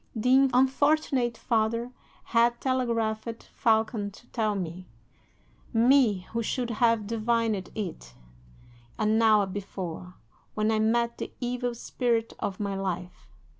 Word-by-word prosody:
The 260 +4 +4
unfortunate 265 -1 +2
father 230 +1 0 0.3
had 235 +1 +2
telegraphed 230 -3 -1
Falcon 220 -2 +1
to 210 +4 -17
tell 215 -3 0
me 180 -1 -5 0.9
me, 235 -4 +4
who 230 - -1
should 240 +1 -2
have 230 -1 +2
divined 225 -2 0
it 165 - -6 0.8
an 215 +1 +2
hour 215 -2 +5
before, 185 -2 -6 0.4
when 215 +1 +1
I 220 - +1
met 235 +2 +1
the - - -5
evil 245 -1 -2
spirit 230 -1 -1
of 195 - -3
my 200 -1 -2
life! 180 -2 -5
225 Hz, 120 wpm, -27 LUFS, 205-240 Hz, 0.9 s, hour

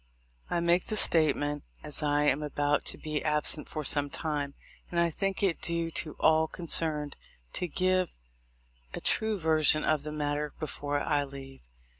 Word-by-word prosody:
"I 170 - 0
make 170 +1 +2
this 215 -2 +2
statement, 145 -2 +3 0.2
as 150 0 0
I 145 0 +2
am 145 0 +2
about 145 0 0
to - - -1
be 155 -1 -3
absent 150 0 +1
for 155 - -4
some 145 0 +2
time, 145 -2 -3 0.3
and 170 - -1
I 170 0 +2
think 195 +4 -2
it 185 -5 +1
due 170 -1 0
to 155 -2 -2
all 160 0 +4
con 175 +2 -8
cerned 150 -3 +2 0.4
to 180 - -1
give 185 +2 0 0.8
a - - -4
true 220 -1 +1
version 155 -2 +3
of 155 -2 +2
the 150 +1 -6
matter 150 0 -2
before 145 -2 -2
I 145 -1 +1
leave. 135 -1 -10
155 Hz, 170 wpm, -29 LUFS, 145-170 Hz, 0.8 s, all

